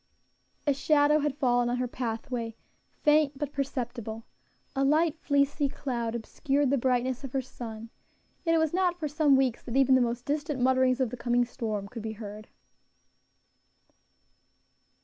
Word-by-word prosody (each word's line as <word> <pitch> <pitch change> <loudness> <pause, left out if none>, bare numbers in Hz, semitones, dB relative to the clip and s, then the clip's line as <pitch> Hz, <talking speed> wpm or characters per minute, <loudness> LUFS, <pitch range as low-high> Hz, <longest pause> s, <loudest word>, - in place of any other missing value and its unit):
A 290 - +3
shadow 295 +2 +3
had 290 -2 -1
fallen 245 -3 +2
on 245 - 0
her 250 0 -1
pathway, 235 -1 -4 0.5
faint, 295 -2 +4
but 290 0 -4
perceptible; 240 -5 -4 0.5
a 270 - +1
light, 310 +3 +3
fleecy 285 0 +2
cloud 235 -5 -3
obscured 270 +4 0
the 280 - +3
brightness 255 +1 0
of 270 - -7
her 270 - +1
sun; 225 -2 -8 0.5
yet 330 -1 +2
it - - +4
was 320 -1 +1
not 360 -1 +1
for 310 - -1
some 295 -1 +3
weeks 265 -3 +1
that 245 +2 -3
even 270 -1 +5
the 260 - +5
most 240 0 -1
distant 295 -1 -2
mutterings 260 0 +3
of 250 -4 0
the 250 - -5
coming 240 0 +2
storm 215 -5 -4
could 230 +2 -8
be 220 0 -4
heard. 210 0 -9
260 Hz, 160 wpm, -28 LUFS, 235-290 Hz, 0.5 s, even